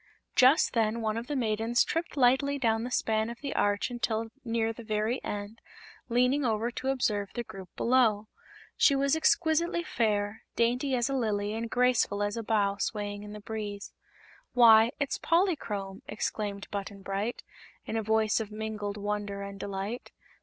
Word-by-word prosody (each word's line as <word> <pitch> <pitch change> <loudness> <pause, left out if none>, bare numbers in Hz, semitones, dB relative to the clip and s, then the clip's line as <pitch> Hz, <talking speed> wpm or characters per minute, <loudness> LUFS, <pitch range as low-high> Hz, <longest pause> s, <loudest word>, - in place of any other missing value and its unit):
Just 260 +5 +5
then 230 -1 +1
one 215 -1 -1
of 230 +1 -4
the 295 - -2
maidens 225 -1 +2
tripped 330 -2 -3
lightly 270 +2 +3
down 225 -4 +1
the 245 - -3
span 220 -2 0
of 235 - -8
the 280 - -3
arch 205 +4 +1
until 225 -2 -2
near 225 -1 0
the 235 - -10
very 215 +3 -1
end, 205 +2 -5 0.5
leaning 250 +4 +2
over 230 0 0
to 260 - -5
observe 215 -7 0
the 240 - -2
group 195 -5 -10
below. 230 -4 +3 0.5
She 280 - +5
was 275 +2 +2
exquisitely 335 +1 +2
fair, 210 -6 -1
dainty 250 +3 +1
as 240 -1 +1
a 275 - -2
lily 210 -4 -1
and 225 +1 -3
graceful 245 -5 +2
as 205 0 -1
a 230 - -3
bough 205 -3 +1
swaying 205 0 -3
in 210 0 -9
the 210 - -8
breeze. 205 -2 -6 0.6
"Why, 230 -2 +7
it's 280 -2 -1
Polychrome!" 225 - 0
exclaimed 205 -1 -3
Button 200 -1 -5
Bright, 200 +5 -3 0.4
in - - -4
a 225 - +1
voice 220 0 +2
of 220 -2 -4
mingled 210 -1 -4
wonder 205 -1 -3
and 200 0 -8
delight. 200 +4 -4
220 Hz, 165 wpm, -29 LUFS, 205-245 Hz, 0.6 s, Why